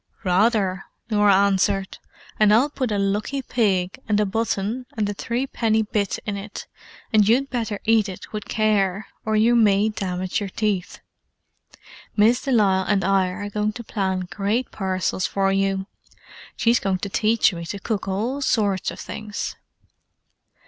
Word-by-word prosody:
"Rather!" 195 0 +2 0.3
Norah 205 -2 +5
answered. 195 0 +1 0.4
"And 210 -1 +5
I'll 250 +7 +4
put 255 -5 -2
a 205 - 0
lucky 210 +7 -1
pig, 195 -7 0
and 210 -1 +3
a 210 - +3
button, 225 +3 -2
and 210 -2 +1
a 205 - -2
threepenny 230 -1 0
bit 205 -2 -1
in 205 -1 -3
it, 200 +1 -7 0.5
so 215 - +6
you'd 240 +7 +2
better 225 -5 -2
eat 220 -2 +3
it 185 - -10
with 210 -1 -4
care, 205 -2 +1 0.2
or 220 0 0
you 225 +3 +4
may 210 -2 +4
damage 185 -3 -2
your 200 -2 -4
teeth. 200 -3 -2 1.2
Miss 225 +4 +4
de 275 - -3
Lisle 195 -5 +3
and 200 -2 +2
I 195 -1 +3
are 205 +3 -5
going 210 +1 -1
to 235 - -7
plan 190 -4 -1
great 210 +5 -1
parcels 185 -1 -1
for 195 -1 +1
you; 195 0 0 0.7
she's 235 +1 +3
going 195 -1 0
to 200 - -5
teach 215 +1 +2
me 170 -1 -6
to 200 - -5
cook 200 +1 -3
all 225 +9 -2
sorts 205 -7 +1
of - - -8
things." 215 0 -5
205 Hz, 160 wpm, -23 LUFS, 195-220 Hz, 1.2 s, so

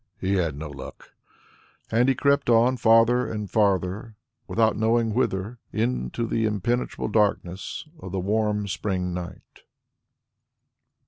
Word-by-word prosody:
"He 95 +1 0
had 85 -7 0
no 80 +1 -5
luck." 70 -2 -10 0.8
And 120 +4 +3
he 135 - +3
crept 140 0 +2
on 120 +2 +4
farther 115 +2 +4
and 105 -2 -4
farther, 100 +1 0 0.3
without 110 -1 +2
knowing 115 0 +1
whither, 110 -1 -1
into 115 - -1
the 115 0 0
impenetrable 110 +4 -1
darkness 100 - -1
of 95 - -8
the 95 - -2
warm 105 +1 0
spring 95 -2 -2
night. 90 0 -8
110 Hz, 125 wpm, -25 LUFS, 95-115 Hz, 0.8 s, on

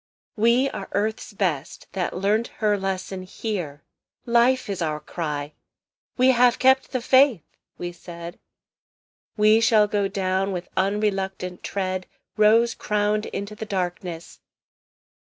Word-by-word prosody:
"We 235 +4 +3
are 195 - -7
Earth's 215 +3 -1
best, 180 -9 -2
that 185 -3 -2
learnt 210 +5 +1
her 210 -2 +2
lesson 190 -1 -3
here. 185 -6 -5 0.4
Life 240 +2 +3
is 195 -3 -4
our 155 -2 -1
cry. 150 -2 -4 0.6
We 255 +1 +5
have 245 -1 +4
kept 265 +1 +3
the 255 - -1
faith!" 260 - +4 0.3
we 175 0 -4
said; 170 0 -10 1.0
"We 215 +1 +5
shall 215 -2 +5
go 205 -1 0
down 195 0 -1
with 180 -1 -5
unreluctant 195 -2 -1
tread 185 -2 -3 0.3
Rose 225 +2 +4
crowned 210 0 0
into 200 +1 -5
the 215 +1 -7
darkness!" 180 -3 -4
200 Hz, 125 wpm, -24 LUFS, 180-220 Hz, 1.0 s, We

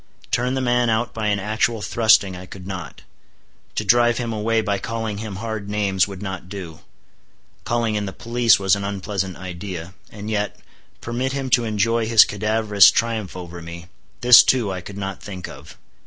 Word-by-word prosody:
Turn 125 +2 0
the 130 - -1
man 120 -1 +2
out 115 +1 0
by 110 -1 -2
an 100 -1 +1
actual 110 +2 -1
thrusting 110 -4 +3
I 90 +1 -9
could 90 0 -11
not; 95 -4 -7 0.7
to - - -2
drive 120 0 +4
him 120 -2 -3
away 110 +1 0
by 100 -2 -1
calling 110 -1 -4
him 110 -2 -6
hard 110 0 -5
names 100 -3 +1
would 100 0 -8
not 95 -2 -6
do; 90 -6 -8 0.9
calling 115 -2 0
in 105 -1 -2
the - - -4
police 115 +2 +2
was 95 0 +3
an 100 - -5
unpleasant 100 -1 -3
idea; 90 -1 -7 0.2
and 105 0 -9
yet, 105 -1 -2 0.4
permit 125 +3 -2
him 135 -2 -3
to 120 -2 +4
enjoy 110 +1 0
his 115 -1 +7
cadaverous 105 0 +4
triumph 110 -5 -2
over 85 -1 -8
me,—this 90 +8 +3
too 120 -6 +1
I 95 -1 -4
could 100 +2 -10
not 95 -1 -5
think 95 -3 -7
of. - - -12
105 Hz, 180 wpm, -21 LUFS, 95-115 Hz, 0.9 s, his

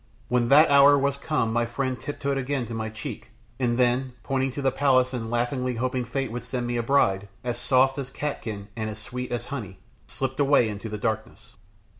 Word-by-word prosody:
When 125 -1 +2
that 145 +2 +7
hour 140 0 +7
was 140 0 +1
come 140 -6 -1
my 120 0 +1
friend 130 +2 -2
tiptoed 140 -1 -3
again 135 -1 -1
to 115 - -7
my 110 -1 -3
cheek, 110 0 -7 0.3
and 120 -2 +1
then, 125 +1 +1
pointing 135 +1 0
to 140 - -4
the 135 - +3
palace 130 -2 +3
and 115 -3 -3
laughingly 125 +1 -1
hoping 125 +1 -1
fate 135 +1 -3
would 120 +1 -5
send 125 -2 -3
me 120 0 -2
a - - +1
bride 100 -6 +2 0.2
"as 120 -1 -2
soft 135 +2 +3
as 130 -2 -4
catkin 110 -8 -5
and 110 -2 -3
as 105 - -6
sweet 125 +3 -6
as 120 0 -2
honey," 100 -9 -6 0.3
slipped 135 +1 -3
away 140 -5 +4
into 105 +2 -6
the 105 - -4
darkness. 110 +2 -4
125 Hz, 205 wpm, -26 LUFS, 115-135 Hz, 0.3 s, that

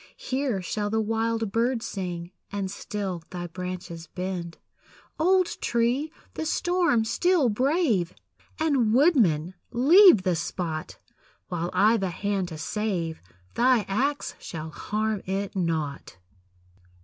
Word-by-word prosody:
Here 260 -7 -2
shall 205 +3 -2
the 220 +1 +1
wild 225 0 0
bird 235 +1 +1
sing, 175 -3 -5 0.2
And 195 -2 -3
still 195 -3 -4
thy 175 -1 -5
branches 175 -1 -6
bend. 180 -1 -5 0.6
Old 370 +2 +3
tree! 240 +6 +1 0.2
the - - -3
storm 345 -10 +2
still 310 +4 +2
brave! 245 - +1 0.4
And, 270 -8 +2
woodman, 205 - +3 0.2
leave 295 - +7
the 185 -2 +1
spot; 165 -1 -4 0.5
While 175 0 -2
I've 220 +1 +4
a 190 - 0
hand 195 +1 -2
to 160 -2 -7
save, 170 -1 -2 0.3
thy 245 -2 +3
axe 275 +9 -1
shall 160 -1 -7
harm 215 +3 -2
it 195 +1 -2
not. 160 - -2
205 Hz, 120 wpm, -26 LUFS, 180-250 Hz, 0.6 s, leave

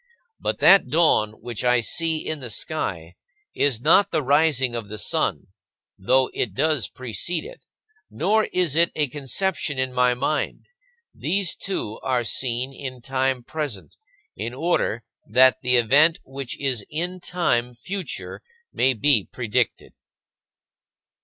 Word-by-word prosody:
But - - -2
that 195 +1 +7
dawn 150 -10 +3
which 120 -2 -6
I 125 -1 +3
see 160 +5 -1
in 155 -1 -3
the 125 -3 -5
sky 90 - -3 0.4
is 135 -6 +1
not 165 +9 +4
the 155 -3 0
rising 140 -2 +2
of 115 -3 -4
the 105 - -6
sun - - -1 0.5
(though 130 +7 +2
it 100 -6 -2
does 155 -2 +1
precede 130 - -3
it), - - -11 0.5
nor 215 +6 +1
is 175 -6 +1
it 170 +1 +4
a 150 -3 0
conception 145 +2 -2
in 130 -1 -1
my 125 0 +3
mind. 145 +4 -2 0.5
These 195 -2 0
two 110 - -4
are 125 -2 0
seen 125 +2 -2
in 130 -2 -7
time 130 0 -1
present, 145 -8 -6 0.4
in 115 +3 -5
order 140 -7 0 0.2
that 130 +4 +4
the 125 -1 +2
event 140 +8 +4
which 135 -1 -7
is 130 -6 -1
in 175 +4 -3
time 125 -10 -1
future 190 +10 -6 0.3
may 130 0 +2
be 110 -2 +2
predicted. 115 -4 -2
130 Hz, 140 wpm, -23 LUFS, 120-160 Hz, 0.5 s, that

